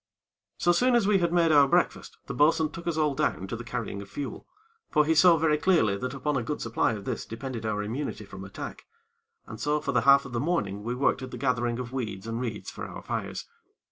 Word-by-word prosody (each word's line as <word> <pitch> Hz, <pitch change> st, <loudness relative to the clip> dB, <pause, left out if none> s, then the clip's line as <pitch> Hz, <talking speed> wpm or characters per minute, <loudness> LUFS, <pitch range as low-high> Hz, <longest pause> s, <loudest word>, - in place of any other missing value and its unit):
So 175 Hz, -, +3 dB
soon 245 Hz, +8 st, +3 dB
as 235 Hz, -4 st, +3 dB
we 200 Hz, -1 st, +4 dB
had 170 Hz, -1 st, +1 dB
made 170 Hz, -2 st, +3 dB
our 145 Hz, -2 st, +6 dB
breakfast, -, -, 0 dB
the -, -, -5 dB
bo'sun 155 Hz, +1 st, +3 dB
took 170 Hz, +1 st, -9 dB
us 165 Hz, -2 st, -1 dB
all 150 Hz, -2 st, +2 dB
down 95 Hz, -, -1 dB
to 95 Hz, -, -4 dB
the 115 Hz, -, -7 dB
carrying 115 Hz, -4 st, -4 dB
of 100 Hz, -, -11 dB
fuel; 140 Hz, +5 st, -6 dB, 0.4 s
for 150 Hz, -1 st, +3 dB
he 160 Hz, -, +3 dB
saw 165 Hz, +1 st, +6 dB
very 155 Hz, -1 st, +2 dB
clearly 155 Hz, -, +3 dB
that 125 Hz, +6 st, -4 dB
upon 150 Hz, +2 st, -1 dB
a 130 Hz, -, +1 dB
good 145 Hz, +6 st, -3 dB
supply 115 Hz, 0 st, 0 dB
of 100 Hz, -2 st, -7 dB
this -, -, -3 dB
depended 115 Hz, -1 st, -5 dB
our 105 Hz, -1 st, -1 dB
immunity 115 Hz, 0 st, -4 dB
from 95 Hz, -1 st, -9 dB
attack. 100 Hz, -, -8 dB, 0.6 s
And -, -, -9 dB
so 150 Hz, +1 st, +1 dB
for 145 Hz, -2 st, -2 dB
the 125 Hz, -, +2 dB
half 140 Hz, 0 st, +6 dB
of -, -, -9 dB
the 120 Hz, -, 0 dB
morning 115 Hz, -, -1 dB
we 120 Hz, +3 st, -3 dB
worked 130 Hz, 0 st, +1 dB
at 130 Hz, -, -6 dB
the -, -, -7 dB
gathering 120 Hz, -3 st, 0 dB
of 125 Hz, 0 st, -6 dB
weed 110 Hz, -6 st, -4 dB
and 115 Hz, +1 st, -3 dB
reeds 110 Hz, -4 st, -4 dB
for -, -, -7 dB
our -, -, -9 dB
fires. -, -, -4 dB
130 Hz, 240 wpm, -27 LUFS, 115-155 Hz, 0.6 s, our